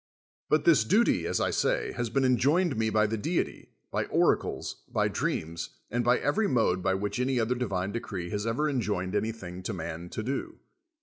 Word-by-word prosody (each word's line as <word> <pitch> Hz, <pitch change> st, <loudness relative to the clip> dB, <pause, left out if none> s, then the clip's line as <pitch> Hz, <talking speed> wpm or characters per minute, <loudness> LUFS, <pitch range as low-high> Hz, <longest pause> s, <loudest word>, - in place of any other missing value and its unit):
But 155 Hz, -, +3 dB
this 155 Hz, -10 st, +6 dB
duty, 215 Hz, -, +3 dB
as -, -, 0 dB
I -, -, +1 dB
say, -, -, +1 dB
has 120 Hz, -1 st, -3 dB
been 135 Hz, +3 st, +1 dB
enjoined 140 Hz, +7 st, +3 dB
me 110 Hz, 0 st, +1 dB
by 110 Hz, 0 st, +3 dB
the 110 Hz, +1 st, -2 dB
deity, 165 Hz, +10 st, -2 dB, 0.2 s
])y -, -, 0 dB
oracles, -, -, +1 dB
by -, -, +2 dB
dreams, 85 Hz, +1 st, -3 dB
and 120 Hz, +2 st, 0 dB
by 120 Hz, +1 st, +4 dB
every 205 Hz, +9 st, +1 dB
mode 110 Hz, -8 st, +2 dB
by 95 Hz, +1 st, +1 dB
which 105 Hz, +5 st, -2 dB
any 130 Hz, 0 st, +1 dB
other 115 Hz, +2 st, +1 dB
divine 100 Hz, -6 st, -2 dB
decree 95 Hz, -6 st, -4 dB
has 105 Hz, +1 st, -2 dB
ever 125 Hz, +7 st, +1 dB
enjoined 105 Hz, -9 st, -1 dB
anything 100 Hz, -4 st, -3 dB
to 110 Hz, -, -4 dB
man 85 Hz, -1 st, -5 dB
to 110 Hz, -, -4 dB
do. 135 Hz, +4 st, -4 dB
115 Hz, 190 wpm, -28 LUFS, 95-130 Hz, 0.2 s, this